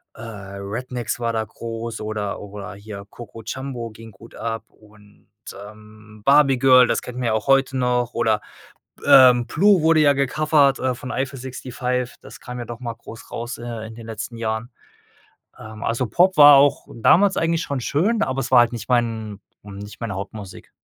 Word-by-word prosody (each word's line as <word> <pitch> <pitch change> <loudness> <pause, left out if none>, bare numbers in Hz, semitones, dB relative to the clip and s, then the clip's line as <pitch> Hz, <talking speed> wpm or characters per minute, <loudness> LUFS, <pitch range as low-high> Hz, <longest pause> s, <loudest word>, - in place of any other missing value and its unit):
äh, - - -12
Rednex 110 +3 -6
war 115 -1 -1
da 110 -1 0
groß 115 +1 -7
oder 105 -2 -4
oder 100 -1 -8
hier 100 0 -9
Coco 115 0 -11
Jamboo 125 -2 -5
ging 115 +1 -13
gut 110 +4 -16
ab. 115 -1 -4
Und, 105 -1 -22 0.4
ähm, 105 0 -16
Barbie 140 -2 +5
Girl, 130 -1 +6
das - - 0
kennen 125 0 -8
wir 120 - -1
ja 110 - +1
auch 110 - -2
heute 135 -1 +3
noch 125 -1 0
oder, 110 -2 +1 0.6
äh, 130 -2 +8
Blue 195 0 +3
wurde 160 0 +4
ja 145 -2 +5
gecovert, 140 0 +2
äh, 130 -1 0
von 130 +1 -8
Eifel 135 0 -3
65, 125 -1 -4
das - - -13
kam 125 0 -8
ja 120 - -5
doch 115 0 -8
mal 120 -2 -5
groß 115 0 -13
raus, 120 +1 -5
äh, 115 -2 -6
in 110 - -10
den 115 0 -11
letzten 115 +1 -6
Jahren. 110 +1 -3 0.9
Ähm, 110 +1 -11
also, 120 +2 -1
Pop 180 - +2
war 145 -1 +10
auch 140 +1 +3
damals 190 - +4
eigentlich 165 0 0
schon 140 -2 -3
schön, 200 - 0
aber 130 0 -2
es 130 - -4
war 125 - +8
halt 120 0 +2
nicht 120 - -7
mein 115 -4 -1 0.2
hm, 100 -1 -10
nicht 105 +1 -10
meine 115 -4 -4
Hauptmusik. 100 0 -8
120 Hz, 185 wpm, -22 LUFS, 110-130 Hz, 0.9 s, war